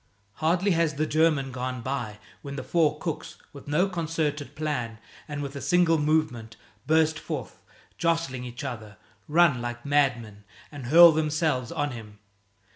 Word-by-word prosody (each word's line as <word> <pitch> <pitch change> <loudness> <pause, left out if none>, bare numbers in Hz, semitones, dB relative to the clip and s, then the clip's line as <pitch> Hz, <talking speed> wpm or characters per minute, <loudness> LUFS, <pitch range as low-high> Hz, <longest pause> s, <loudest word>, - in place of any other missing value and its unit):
Hardly 175 +5 +1
has 165 -3 +1
the 155 +2 0
German 155 -4 +2
gone 125 -1 -4
by 120 -5 -4 0.2
when 140 0 -7
the 140 - -5
four 155 -3 +1
cooks, 160 0 -5 0.2
with 140 -1 -12
no 155 +6 +2
concerted 160 -5 -3
plan 125 -8 -3 0.3
and 145 -1 -4
with 140 0 -6
a 140 - -5
single 165 +3 +3
movement, 145 -7 0 0.3
burst 160 0 +3
forth, 145 -8 -6 0.4
jostling 165 -7 0
each 120 0 -7
other, 110 -4 -7 0.3
run 155 -5 +4
like 120 +1 -5
madmen, 125 -8 0 0.3
and 140 -5 -8
hurl 170 +4 +9
themselves 155 -4 0
on 145 -4 -2
him. 110 -3 -10
145 Hz, 150 wpm, -26 LUFS, 125-160 Hz, 0.4 s, hurl